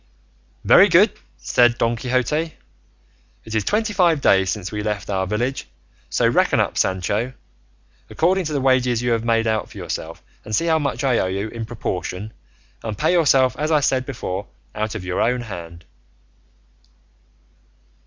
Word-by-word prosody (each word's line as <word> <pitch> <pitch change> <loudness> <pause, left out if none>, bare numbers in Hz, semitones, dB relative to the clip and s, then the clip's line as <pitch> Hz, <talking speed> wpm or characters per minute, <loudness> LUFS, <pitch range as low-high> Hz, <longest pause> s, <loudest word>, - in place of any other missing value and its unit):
"Very - - +7
good," - - +5 0.3
said 120 -1 +2
Don 115 0 +1
Quixote; 130 +7 -1 0.9
"it 110 - -8
is 110 -2 +1
twenty 215 - 0
five 175 -6 +3
days 95 -7 +3
since 95 -1 -3
we 105 -1 -3
left 105 -1 -3
our 95 -1 -1
village, 120 +7 -2 0.4
so - - +2
reckon - - +2
up, - - 0
Sancho, 100 +6 -1 0.8
according 185 +3 +1
to 155 - -3
the 140 - 0
wages 125 -2 +2
you 120 - +1
have 115 -1 0
made 115 -1 +1
out 110 -2 -1
for - - -13
yourself, 85 -2 -6 0.2
and 110 - -3
see 165 - +1
how 160 -1 +2
much 140 -1 -2
I 130 -4 +2
owe - - 0
you 100 +3 -3
in 115 -1 -6
proportion, 105 -2 -5 0.5
and 110 -3 -4
pay - - +2
yourself, 135 -7 +4
as 155 +2 -1
I 150 -2 +4
said 130 -2 0
before, 100 -7 -5 0.3
out 110 +1 -3
of 95 -4 -6
your 90 0 -1
own 125 +1 +1
hand." 85 -6 -9
115 Hz, 165 wpm, -21 LUFS, 100-135 Hz, 0.9 s, Very